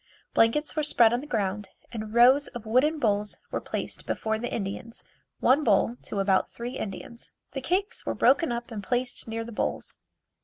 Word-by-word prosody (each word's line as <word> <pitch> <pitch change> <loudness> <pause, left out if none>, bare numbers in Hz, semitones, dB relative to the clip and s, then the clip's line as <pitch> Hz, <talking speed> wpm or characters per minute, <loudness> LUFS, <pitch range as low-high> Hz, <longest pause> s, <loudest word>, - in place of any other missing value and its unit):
Blankets 290 +7 +3
were 310 - +1
spread 240 -6 +4
on 240 - 0
the 295 - -9
ground 205 -5 -2 0.2
and 215 -2 -5
rows 250 +5 +6
of 235 -2 -9
wooden 260 +8 +3
bowls 210 -5 0
were - - -2
placed - - -4
before 220 0 -1
the 240 - -4
Indians, 225 +2 -5 0.4
one 280 +4 +4
bowl 225 +1 +3
to 200 - -4
about 195 -1 +2
three 240 +2 -6
Indians. 225 +4 -7 0.2
The 270 - -4
cakes 390 - 0
were - - -2
broken 280 +1 +3
up 235 +1 -4
and 215 -2 -4
placed 245 0 -1
near 225 0 -3
the 235 - -9
bowls. 210 - -3
235 Hz, 185 wpm, -27 LUFS, 215-260 Hz, 0.4 s, rows